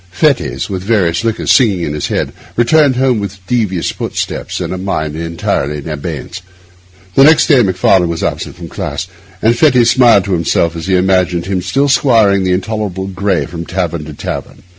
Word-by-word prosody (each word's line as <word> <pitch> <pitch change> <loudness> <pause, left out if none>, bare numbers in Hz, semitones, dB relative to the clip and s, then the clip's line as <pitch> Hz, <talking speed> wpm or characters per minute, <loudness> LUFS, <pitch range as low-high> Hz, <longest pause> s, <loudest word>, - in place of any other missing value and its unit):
Fettes, 140 - 0
with 95 -3 -4
various 95 -4 +1
liquors 115 -1 0
singing 105 -9 +3
in 75 - -3
his 75 - -3
head, - - -2 0.2
returned 140 +3 +3
home 125 -3 +1
with 100 -1 -5
devious 100 -7 -1
footsteps - - -4
and - - -3
a - - -4
mind 80 -6 -3
entirely 80 -3 -2
in 75 - -8
abeyance. 80 +4 -6 0.7
Next 150 +3 +6
day 140 -6 +5
Macfarlane 95 -3 +2
was 85 -1 -3
absent - - -3
from 85 -1 -9
the - - -15
class, 80 -4 -4 0.4
and 115 +2 +4
Fettes 125 -4 +4
smiled 120 -7 +4
to 100 - -2
himself 85 -1 0
as 80 +1 -6
he 95 - +2
imagined 90 -2 +1
him 95 -1 -2
still 135 +11 0
squiring 110 -8 +3
the 95 - 0
intolerable 95 0 -2
Gray 95 -1 -1
from 85 -1 -7
tavern 85 -3 -3
to 75 - -8
tavern. - - -6
95 Hz, 185 wpm, -14 LUFS, 85-115 Hz, 0.7 s, Next